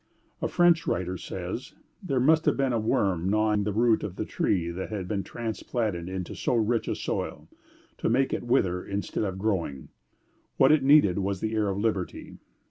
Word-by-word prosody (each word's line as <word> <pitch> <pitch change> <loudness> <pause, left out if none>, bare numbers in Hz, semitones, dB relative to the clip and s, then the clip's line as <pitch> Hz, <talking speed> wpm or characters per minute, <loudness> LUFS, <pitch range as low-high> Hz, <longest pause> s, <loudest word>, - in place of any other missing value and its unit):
A - - +1
French 175 -2 +3
writer 90 +1 -1
says: - - -6 0.3
"There 135 - -1
must 160 +5 +4
have - - +2
been 135 -2 +1
a 115 - +1
worm 95 -5 +1
gnawing 105 0 +2
the 105 - 0
root 115 +2 +3
of 95 - -5
the - - -3
tree 85 -3 0
that 95 +2 -5
had 100 -4 -4
been 100 0 -1
transplanted 110 -5 -3
into 95 -2 -5
so 125 - -1
rich 115 0 +1
a - - -1
soil, - - -4 0.5
to - - 0
make 130 +4 +2
it - - -1
wither 95 -8 +1
instead 100 +2 -3
of 95 -2 -3
growing. 95 -10 -2 0.7
What 135 - +6
it 155 -2 +5
needed 135 -9 +5
was 100 -1 -1
the 110 +2 -2
air 110 -2 +1
of 95 -1 -1
liberty." 100 -4 -3
105 Hz, 190 wpm, -27 LUFS, 95-120 Hz, 0.7 s, What